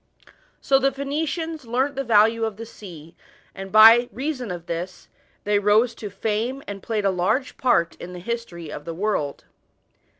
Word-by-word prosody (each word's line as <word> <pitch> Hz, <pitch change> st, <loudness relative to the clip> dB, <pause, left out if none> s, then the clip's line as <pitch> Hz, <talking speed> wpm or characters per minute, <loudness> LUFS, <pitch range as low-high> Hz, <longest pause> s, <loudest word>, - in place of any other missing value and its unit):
So 270 Hz, -1 st, +3 dB
the 275 Hz, 0 st, +2 dB
Phoenicians 305 Hz, +2 st, -3 dB
learnt 260 Hz, +5 st, 0 dB
the 275 Hz, -, -2 dB
value 225 Hz, -1 st, +3 dB
of 220 Hz, -3 st, -2 dB
the 230 Hz, -, -7 dB
sea, 170 Hz, -7 st, -12 dB, 0.4 s
and 195 Hz, 0 st, -8 dB
by 225 Hz, +3 st, +8 dB
reason 260 Hz, -3 st, -4 dB
of 175 Hz, -2 st, -6 dB
this, 175 Hz, +2 st, -6 dB, 0.4 s
they 205 Hz, 0 st, +2 dB
rose 215 Hz, +4 st, +3 dB
to 210 Hz, -, -7 dB
fame 220 Hz, +7 st, -2 dB
and 200 Hz, -1 st, -7 dB
played 215 Hz, -3 st, -2 dB
a 195 Hz, -, +3 dB
large 190 Hz, +9 st, -1 dB
part 170 Hz, -10 st, +2 dB
in 175 Hz, -, -8 dB
the 180 Hz, -, -8 dB
history 175 Hz, -6 st, -5 dB
of 145 Hz, -, -7 dB
the 165 Hz, -, -5 dB
world. 175 Hz, -7 st, -2 dB
220 Hz, 170 wpm, -23 LUFS, 185-255 Hz, 0.4 s, by